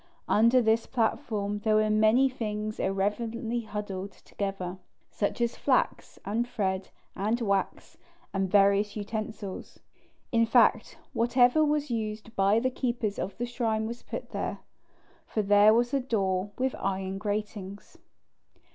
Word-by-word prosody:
Under 235 Hz, +3 st, +4 dB
this 225 Hz, +1 st, +2 dB
platform 210 Hz, -4 st, -1 dB
there 215 Hz, +1 st, +2 dB
were 215 Hz, 0 st, +3 dB
many 220 Hz, +5 st, +4 dB
things 215 Hz, -4 st, -4 dB
irreverently 225 Hz, +5 st, -1 dB
huddled 205 Hz, -3 st, -5 dB
together, 190 Hz, -2 st, -5 dB, 0.3 s
such 205 Hz, -, -2 dB
as 235 Hz, 0 st, +1 dB
flax -, -, 0 dB
and 225 Hz, +4 st, -1 dB
thread 195 Hz, -5 st, -2 dB, 0.3 s
and 215 Hz, +5 st, 0 dB
wax, 200 Hz, -4 st, -2 dB, 0.3 s
and 195 Hz, -1 st, 0 dB
various 200 Hz, +1 st, +3 dB
utensils. 215 Hz, -1 st, -5 dB, 0.5 s
In 230 Hz, -1 st, +3 dB
fact, -, -, +3 dB, 0.2 s
whatever 245 Hz, +5 st, +4 dB
was 295 Hz, -2 st, 0 dB
used 220 Hz, 0 st, -4 dB
by 200 Hz, +3 st, +3 dB
the 255 Hz, +2 st, 0 dB
keepers 235 Hz, -5 st, -2 dB
of 190 Hz, 0 st, -4 dB
the 240 Hz, -, -2 dB
shrine 230 Hz, -3 st, -1 dB
was 235 Hz, +2 st, -6 dB
put -, -, -7 dB
there, -, -, -3 dB, 0.7 s
for 215 Hz, -, -1 dB
there 205 Hz, +1 st, +6 dB
was 240 Hz, +3 st, +2 dB
a 275 Hz, -, +3 dB
door 200 Hz, -6 st, -1 dB
with 260 Hz, 0 st, 0 dB
iron 190 Hz, 0 st, -2 dB
gratings. 205 Hz, -1 st, -5 dB
215 Hz, 135 wpm, -28 LUFS, 200-235 Hz, 0.7 s, there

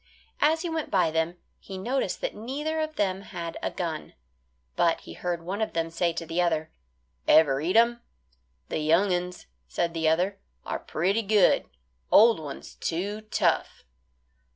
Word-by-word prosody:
As 320 Hz, +3 st, +3 dB
he 345 Hz, -, -2 dB
went 320 Hz, -2 st, -2 dB
by 180 Hz, -5 st, +2 dB
them, 160 Hz, +2 st, -1 dB, 0.2 s
he 190 Hz, -, -8 dB
noticed 235 Hz, 0 st, -1 dB
that -, -, -2 dB
neither 290 Hz, +8 st, -3 dB
of 310 Hz, 0 st, -2 dB
them 190 Hz, -1 st, 0 dB
had 170 Hz, -4 st, -6 dB
a -, -, -1 dB
gun, 165 Hz, -4 st, -5 dB, 0.6 s
but 165 Hz, -1 st, +2 dB
he -, -, -10 dB
heard 175 Hz, -2 st, -3 dB
one 195 Hz, +5 st, -3 dB
of 220 Hz, -, -1 dB
them 165 Hz, 0 st, -1 dB
say 170 Hz, +1 st, +1 dB
to 165 Hz, -, -4 dB
the 165 Hz, +2 st, 0 dB
other, 160 Hz, -2 st, 0 dB, 0.6 s
"Ever 140 Hz, -3 st, +5 dB
eat 175 Hz, +6 st, 0 dB
'em?" 235 Hz, +1 st, +4 dB, 0.7 s
"The -, -, -1 dB
young 170 Hz, +5 st, +3 dB
uns," 180 Hz, 0 st, -3 dB, 0.2 s
said 170 Hz, -, -1 dB
the 160 Hz, -1 st, +2 dB
other, 180 Hz, +5 st, +1 dB, 0.3 s
"are -, -, -3 dB
pretty 195 Hz, +7 st, 0 dB
good; 205 Hz, -3 st, +3 dB, 0.4 s
old 225 Hz, -2 st, +7 dB
ones 145 Hz, -3 st, -8 dB
too 200 Hz, +6 st, -3 dB
tough." -, -, 0 dB
180 Hz, 165 wpm, -27 LUFS, 165-215 Hz, 0.7 s, old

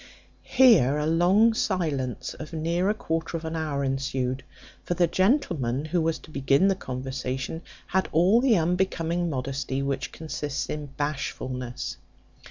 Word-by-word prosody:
Here 220 Hz, -, +6 dB
a 150 Hz, -, 0 dB
long 180 Hz, +8 st, +4 dB
silence 155 Hz, -, -1 dB
of 155 Hz, +1 st, -9 dB
near 170 Hz, +4 st, 0 dB
a -, -, +3 dB
quarter 165 Hz, -3 st, -2 dB
of 165 Hz, -, -8 dB
an 160 Hz, +1 st, -3 dB
hour 150 Hz, -3 st, -1 dB
ensued; 135 Hz, -1 st, -1 dB, 0.4 s
for 175 Hz, -, -2 dB
the 175 Hz, 0 st, +4 dB
gentleman 170 Hz, -, +1 dB
who 170 Hz, +2 st, 0 dB
was 160 Hz, 0 st, 0 dB
to -, -, -15 dB
begin 140 Hz, +6 st, +3 dB
the 195 Hz, -, +2 dB
conversation 130 Hz, +1 st, -4 dB, 0.2 s
had 190 Hz, +1 st, 0 dB
all 185 Hz, +9 st, +4 dB
the 250 Hz, -5 st, +4 dB
unbecoming 175 Hz, 0 st, 0 dB
modesty 135 Hz, 0 st, -2 dB
which 135 Hz, -1 st, -2 dB
consists 150 Hz, -3 st, -4 dB
in 150 Hz, -1 st, -4 dB
bashfulness. 130 Hz, -4 st, -3 dB
155 Hz, 145 wpm, -26 LUFS, 135-175 Hz, 0.4 s, Here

